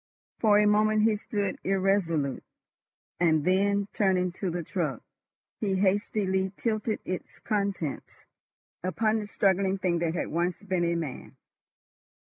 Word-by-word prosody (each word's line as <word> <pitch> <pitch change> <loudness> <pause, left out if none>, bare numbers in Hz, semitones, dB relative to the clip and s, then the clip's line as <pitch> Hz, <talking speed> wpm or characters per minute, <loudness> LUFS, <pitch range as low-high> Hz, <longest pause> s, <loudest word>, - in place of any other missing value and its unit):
For 210 -2 +5
a 210 - +5
moment 215 +1 +3
he 220 -1 +4
stood 205 -2 -3
irresolute, 185 -7 +1 0.8
and 160 -3 +3
then, 200 +2 +2
turning 185 -3 +2
to 185 +1 -3
the 175 0 -3
truck, 155 - -3 0.6
he 200 -3 0
hastily 190 -1 +1
tilted 215 -1 -1
its 185 - -5
contents 200 -8 -3 0.6
upon 215 +5 +1
the 210 - -5
struggling 195 -1 +1
thing 180 -3 0
that 170 0 -1
had - - -2
once 175 +4 -1
been 185 -3 0
a 170 0 +1
man. 160 -6 -5
190 Hz, 130 wpm, -28 LUFS, 175-205 Hz, 0.8 s, For